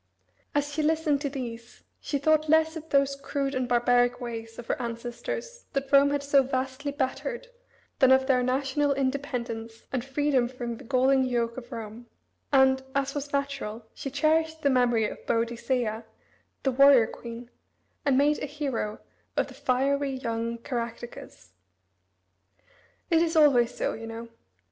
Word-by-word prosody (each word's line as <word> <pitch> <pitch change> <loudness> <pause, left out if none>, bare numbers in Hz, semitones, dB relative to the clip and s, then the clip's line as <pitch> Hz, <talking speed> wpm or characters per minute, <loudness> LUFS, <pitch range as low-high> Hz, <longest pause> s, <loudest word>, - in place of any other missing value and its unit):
As 290 0 0
she 310 - 0
listened 305 -2 +1
to 285 - -1
these 240 -4 -7 0.2
she 285 - -2
thought 310 +2 +2
less 320 +1 +4
of 320 0 -8
those 275 0 +3
crude 275 0 -3
and 255 -2 -1
barbaric 245 0 +3
ways 225 -2 -6
of 240 - -8
her - - -2
ancestors 250 - -5
that 275 0 -2
Rome 280 0 +6
had 285 0 -1
so 280 -1 +5
vastly 265 +2 -2
bettered 310 - -3 0.5
than 260 -1 +6
of 265 0 +5
their 260 -2 +3
national 270 +3 +1
independence 245 -4 -3
and 255 -3 -1
freedom 275 -2 +1
from 240 -2 -5
the - - -12
galling 265 +1 +3
yoke 235 -2 -1
of 245 -2 -9
Rome, 225 +1 -7 0.4
and, 265 -1 +5
as 275 0 0
was 290 0 -4
natural, 275 -6 -3
she 275 - -5
cherished 315 +3 +1
the 280 - +4
memory 240 -4 +3
of - - -9
Boadicea, 230 -1 -1 0.6
the 270 - +2
warrior 275 -2 +7
queen, 235 +2 -9 0.5
and 275 -3 +3
made 295 +2 +3
a - - -3
hero 270 -7 -3 0.4
of - - +1
the - - -11
fiery 275 +2 0
young 230 -2 -3
Caractacus. 235 - -6 1.6
It 325 -1 +5
is 335 0 +1
always 275 -7 +5
so, - - -1
you 225 0 -7
know. 230 +1 -7
265 Hz, 155 wpm, -27 LUFS, 235-285 Hz, 1.6 s, warrior